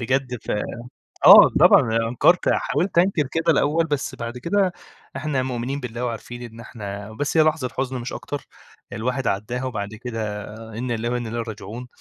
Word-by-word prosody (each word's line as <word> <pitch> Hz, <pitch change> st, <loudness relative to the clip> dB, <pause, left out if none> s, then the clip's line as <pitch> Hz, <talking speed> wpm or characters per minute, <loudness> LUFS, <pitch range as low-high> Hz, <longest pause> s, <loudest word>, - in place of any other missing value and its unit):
بجد 130 Hz, +1 st, -1 dB
ف -, -, -5 dB, 0.8 s
آه -, -, +11 dB
طبعًا 115 Hz, 0 st, +6 dB
أنكرت، 170 Hz, +9 st, +3 dB
حاولت 180 Hz, -1 st, -1 dB
أنكر 170 Hz, -5 st, +3 dB
كده 165 Hz, 0 st, +2 dB
الأول 155 Hz, +2 st, +2 dB
بس 145 Hz, -3 st, -2 dB
بعد 115 Hz, 0 st, -6 dB
كده 185 Hz, +8 st, +1 dB, 0.4 s
إحنا 140 Hz, -2 st, -1 dB
مؤمنين 130 Hz, +2 st, -3 dB
بالله 125 Hz, -1 st, -4 dB
وعارفين 120 Hz, +1 st, -6 dB
إن 115 Hz, -1 st, -10 dB
إحنا 105 Hz, -3 st, -7 dB
بس 145 Hz, +7 st, -2 dB
هي 160 Hz, -, +7 dB
لحظة 155 Hz, -4 st, 0 dB
حزن 130 Hz, -1 st, -2 dB
مش 120 Hz, -, -6 dB
أكتر 145 Hz, -1 st, -6 dB, 0.5 s
الواحد 125 Hz, +4 st, -2 dB
عدّاها، 110 Hz, +6 st, -2 dB
وبعد 105 Hz, -6 st, -3 dB
كده 110 Hz, -3 st, -5 dB, 0.3 s
إن 125 Hz, +1 st, -3 dB
لله 115 Hz, 0 st, -2 dB
وإن 120 Hz, -1 st, -2 dB
إليه 115 Hz, +1 st, -3 dB
راجعون، 115 Hz, +2 st, -7 dB
125 Hz, 165 wpm, -23 LUFS, 115-140 Hz, 0.8 s, آه